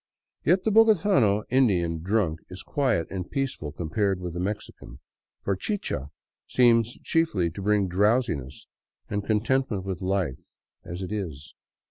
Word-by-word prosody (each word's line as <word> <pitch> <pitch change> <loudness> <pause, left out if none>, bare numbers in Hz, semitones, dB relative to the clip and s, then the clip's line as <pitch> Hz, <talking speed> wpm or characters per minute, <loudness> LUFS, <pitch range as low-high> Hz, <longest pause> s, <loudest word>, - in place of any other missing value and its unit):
Yet 180 +4 +3
the 220 - +1
iDOgotano 195 - +4
Indian 90 -11 +2
drunk 90 -3 0
is 90 +1 -8
quiet 125 - +1
and 95 -2 -4
peaceful 135 - -3
compared 95 +5 -1
with 90 -2 -5
the 90 - -4
Mexican, 95 - -5 0.5
for 100 - 0
chicha 95 - -3 0.4
seems 120 -2 +3
chiefly 135 - +1
to 100 - -7
bring 105 -1 +2
drowsiness 95 - 0 0.5
and 100 -1 -1
con 105 0 +1
tentment 125 -5 0
with 95 0 -4
life 95 -8 -2 0.3
as 90 +3 -6
it 95 - -5
is. 85 -9 -5
100 Hz, 140 wpm, -26 LUFS, 90-120 Hz, 0.5 s, iDOgotano